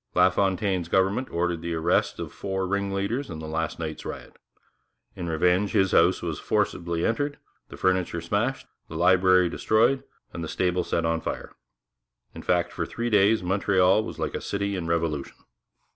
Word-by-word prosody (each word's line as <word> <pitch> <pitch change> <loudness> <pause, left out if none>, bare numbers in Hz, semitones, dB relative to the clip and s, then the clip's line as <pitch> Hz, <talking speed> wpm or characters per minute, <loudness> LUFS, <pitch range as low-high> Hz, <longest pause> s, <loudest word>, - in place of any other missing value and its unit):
LaFontaine's 95 0 +2
government 95 +8 +1
ordered 85 -1 -1
the 85 0 -3
arrest 80 +2 +1
of - - -6
four 95 -1 -3
ringleaders 100 +6 -2
in 80 - -6
the 80 0 -7
last 80 +1 -2
night's 80 -2 -5
riot. - - -8 0.8
In 85 -1 -4
revenge 90 +5 +2
his 95 -3 +3
house 90 +2 +4
was 80 -4 -3
entered - - -15
forcibly, 85 0 0
the 145 +6 -4
furniture 95 -2 +1
smashed, 105 +10 -1 0.2
the 80 - -9
library 90 +1 +4
destroyed, 115 +9 +2 0.3
and 85 - -5
the - - -4
stable 90 +1 0
set 85 -1 -1
on 80 0 0
fire. - - -5 0.8
In - - -8
fact, 90 -1 +1
for - - -3
three 120 0 -3
days 105 0 +4
Montreal 95 +1 +3
was - - -7
like - - -3
a - - -4
city 100 0 -2
in 85 -3 -4
revolution. 80 -4 -1
90 Hz, 165 wpm, -26 LUFS, 85-100 Hz, 0.8 s, house